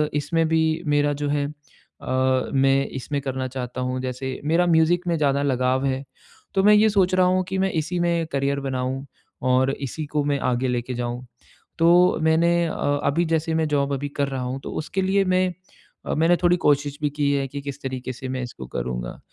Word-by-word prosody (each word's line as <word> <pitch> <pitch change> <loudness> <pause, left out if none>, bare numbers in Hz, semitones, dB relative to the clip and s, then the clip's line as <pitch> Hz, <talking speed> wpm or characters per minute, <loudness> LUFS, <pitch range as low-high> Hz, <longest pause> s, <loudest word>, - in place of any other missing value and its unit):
इसमें 160 +3 +1
भी 160 0 +3 0.3
मेरा 145 0 +2
जो 145 - 0
है 145 0 0
अ, 130 -3 -3
मैं 135 0 +3
इसमें 140 +2 -4
करना 130 -1 -3
चाहता 130 -1 -5
हूँ। 125 0 -2
जैसे 130 +1 -4
मेरा 165 +4 +3
म्यूज़िक 170 +2 +3
में 170 -1 +1
ज़्यादा 140 -2 +1
लगाव 130 -1 +1
है, 135 0 -1 0.5
तो 195 - +3
मैं 210 +1 +7
ये 215 +1 +5
सोच 190 -3 +2
रहा 185 0 +4
हूँ 185 +1 +2
कि 190 - -2
मैं 190 0 +1
इसी 165 +2 -2
में 170 -1 +1
करियर 140 0 0
बनाऊँ 130 0 -3 0.5
और 130 +1 +3
इसी 140 +3 -5
को 150 0 -1
मैं 145 -1 0
आगे 125 +2 0
लेके 125 +1 -2
जाऊँ। 120 +1 -4 0.5
तो 175 +2 +5
मैंने 170 +2 +3
अ, - - -4 0.3
अभी 165 +5 +1
जैसे 160 0 0
मैं 160 -1 +1
जॉब 140 -1 +1
अभी 140 +1 -3
कर 140 -1 +1
रहा 135 -1 -3
हूँ, 125 +2 -3
तो - - -7
उसके 190 +5 -2
लिए 195 +1 +2
मैं 185 0 +1 0.5
अ, - - 0
मैंने 165 +3 +4
थोड़ी 175 0 +4
कोशिश 145 0 +2
भी 150 - +1
की 145 0 0
है 140 -1 0
कि 140 +2 -6
किस 140 -1 -7
तरीके 130 -1 -4
से 130 +2 -7
मैं 130 0 -3
इसको 120 - -8
करूँगा। - - -4
145 Hz, 205 wpm, -23 LUFS, 130-165 Hz, 0.5 s, मैं